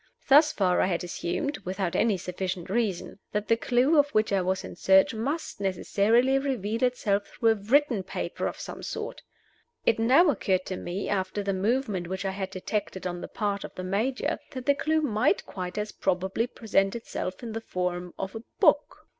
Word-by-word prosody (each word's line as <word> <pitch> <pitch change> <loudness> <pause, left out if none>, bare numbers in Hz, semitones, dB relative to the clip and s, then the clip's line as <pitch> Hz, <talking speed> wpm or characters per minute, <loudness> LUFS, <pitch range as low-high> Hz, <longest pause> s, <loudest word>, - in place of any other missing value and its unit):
Thus 300 +3 +7
far 185 -7 +2
I - - +3
had 175 -2 -1
assumed 180 - -3
(without 185 -1 -3
any 215 -4 +3
sufficient 180 0 -4
reason) 205 -4 -1
that 210 0 -1
the 230 - +6
clew 255 +6 +3
of 290 0 +4
which 215 -1 +2
I 195 - +3
was 185 +1 -1
in - - -8
search 190 +3 +4
must 265 +2 -3
necessarily 220 +7 +2
reveal 230 -5 -2
itself 210 -5 +1
through 230 -2 +1
a - - +6
written 230 +2 +2
paper 185 - -3
of - - -5
some - - -7
sort. - - -5 0.6
It 225 - +3
now 275 +9 +5
occurred 190 -6 0
to 185 - -4
me 180 +2 -4
after 200 +1 -1
the 200 0 0
movement 205 -2 0
which 190 +2 -4
I 195 - 0
had 190 0 -4
detected 190 0 -4
on 175 -1 -3
the - - -5
part 205 -2 -2
of - - -9
the 185 - -5
Major 220 +8 -1
that 255 -2 -6
the 285 - +5
clew 315 +3 +1
might 215 -7 +1
quite 180 -1 -6
as 210 0 -2
probably 190 +5 0
present 195 -4 0
itself 205 -3 -5
in 230 - -5
the 225 +1 -4
form 180 -3 -3
of 190 0 -4
a 225 - -5 0.2
book. - - +2
205 Hz, 195 wpm, -27 LUFS, 185-240 Hz, 0.6 s, Thus